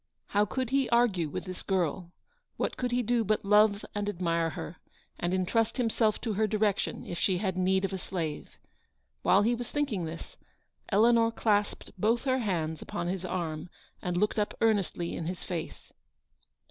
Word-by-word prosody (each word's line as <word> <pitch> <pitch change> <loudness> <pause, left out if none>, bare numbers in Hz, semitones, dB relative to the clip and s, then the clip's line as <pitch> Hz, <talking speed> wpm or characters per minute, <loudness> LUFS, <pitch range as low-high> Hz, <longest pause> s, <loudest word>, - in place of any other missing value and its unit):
How 205 +1 +3
could 255 +3 -3
he 270 -1 +2
argue 220 -9 +3
with - - -4
this 185 -1 -6
girl? 180 -2 -1 0.5
What - - -1
could 250 - -1
he 245 0 +1
do 235 +1 +2
but 215 -1 0
love 210 0 +4
and 205 0 -1
admire 170 -3 0
her, 160 +1 -7 0.4
and 175 - -1
entrust 190 +6 +1
himself 225 -3 +2
to 225 - -1
her 215 +2 +2
direction 210 -1 0
if 175 - -5
she 185 -2 +2
had 190 -1 -1
need 190 +1 +2
of 195 - -4
a 190 - -3
slave. 165 -5 -4 0.6
While 200 - +4
he 235 +3 +3
was 240 0 -4
thinking 240 - -1
this, 160 +1 -8 0.5
Eleanor 230 +2 +4
clasped 210 -2 0
both 225 +5 +2
her 260 -1 +1
hands 165 -8 -1
upon 175 - -3
his 185 0 -3
arm 165 -2 -3 0.3
and 180 -1 -2
looked 210 +3 +1
up 205 - -1
earnestly 200 -6 +1
in 160 - -4
his 180 +1 -4
face. 170 -3 -6
200 Hz, 175 wpm, -29 LUFS, 180-225 Hz, 0.6 s, love